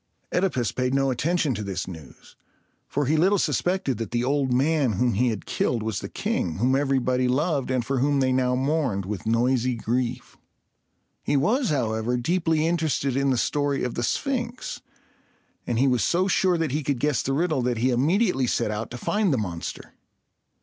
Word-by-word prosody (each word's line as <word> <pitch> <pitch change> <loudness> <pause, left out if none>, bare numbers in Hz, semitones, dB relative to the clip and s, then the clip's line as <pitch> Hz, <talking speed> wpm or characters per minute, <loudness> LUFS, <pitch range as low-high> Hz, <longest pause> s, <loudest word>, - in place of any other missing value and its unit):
OEdipus 150 - 0
paid 130 +1 0
no 135 -1 +2
attention 155 +2 0
to 110 - -4
this 95 -3 -4
news; 80 -5 -12 0.5
for 145 +1 -1
he 150 +4 +2
little 190 +6 +4
suspected 175 - 0
that 115 -4 -3
the 120 0 -1
old 135 0 +1
man 135 -1 +2
whom 120 +5 +1
he 120 +6 +2
had 110 -4 -2
killed 115 -3 -1
was 110 -3 -2
the - - -7
king, 80 - -2
whom 125 +6 +2
everybody 130 -2 +1
loved, 140 +1 0
and 130 -3 0
for 135 +1 -1
whom 140 +2 +2
they 130 -1 +2
now 130 -1 +2
mourned 130 - 0
with 105 +1 -5
noisy 125 +2 +2
grief. 120 +2 -3 0.8
He 145 - +1
was, 230 - +1
however, 120 -3 0
deeply 160 +3 +1
interested 155 -6 0
in 140 0 +1
the 130 - +2
story 145 +2 0
of 125 - -2
the - - -3
Sphinx; 250 - -2 0.9
and 120 - 0
he 135 +3 +3
was 125 -2 +2
so 185 +2 +2
sure 185 -2 +2
that 165 -4 -1
he 150 +3 -1
could 140 -1 -1
guess 150 -1 +1
the 135 - -2
riddle, 155 -2 +1
that 120 -1 0
he 125 +3 +2
immediately 145 - +2
set 105 - 0
out 105 +2 -4
to 125 - -7
find 205 - 0
the 135 - +2
monster. 90 -6 -5
130 Hz, 190 wpm, -25 LUFS, 120-155 Hz, 0.9 s, little